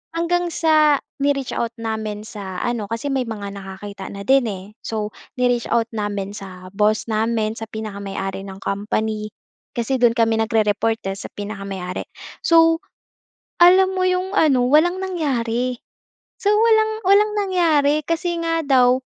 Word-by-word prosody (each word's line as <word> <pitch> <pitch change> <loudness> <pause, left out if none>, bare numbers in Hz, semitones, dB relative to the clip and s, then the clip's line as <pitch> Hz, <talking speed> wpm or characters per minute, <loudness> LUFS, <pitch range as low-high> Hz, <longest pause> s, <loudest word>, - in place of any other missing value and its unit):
hanggang 350 +1 +1
sa 305 -3 +4 0.2
ni-reach 275 -2 0
out 235 0 -2
namin 220 -2 -4
sa 195 -4 -7
ano 235 -4 -1
kasi 230 +6 -4
may 265 -2 +1
mga 205 -3 -5
nakakita 195 0 -8
na 200 - -7
din, 265 0 +4
eh. 190 -3 -5 0.2
So 215 -1 -4 0.2
ni-reach 245 -1 +1
out 230 -1 +1
namin 205 -2 -3
sa 185 -2 -10
boss 215 +2 +1
namin, 220 0 0
sa 225 - -6
pinakamay-ari 200 -2 -5
ng 190 0 -9
company 215 +1 -2 0.4
kasi 245 +3 0
do'n 240 -2 +4
kami 225 -1 +2
nagre-report 225 0 +1
eh, 195 - -6
sa - - -7
pinakamay-ari. 195 -3 -5 0.4
So 330 -1 +5 0.8
alam 375 +2 +7
mo 370 - +1
'yong 370 +2 -1
ano, 260 -5 +4
walang 350 +5 +4
nangyari. 250 -9 -1 0.6
So 415 -2 +3
walang 440 0 +4
walang 415 +2 +5
nangyari 320 -7 +2
kasi 340 +1 -1
nga 330 0 0
daw 255 -2 +4
230 Hz, 145 wpm, -21 LUFS, 210-315 Hz, 0.8 s, alam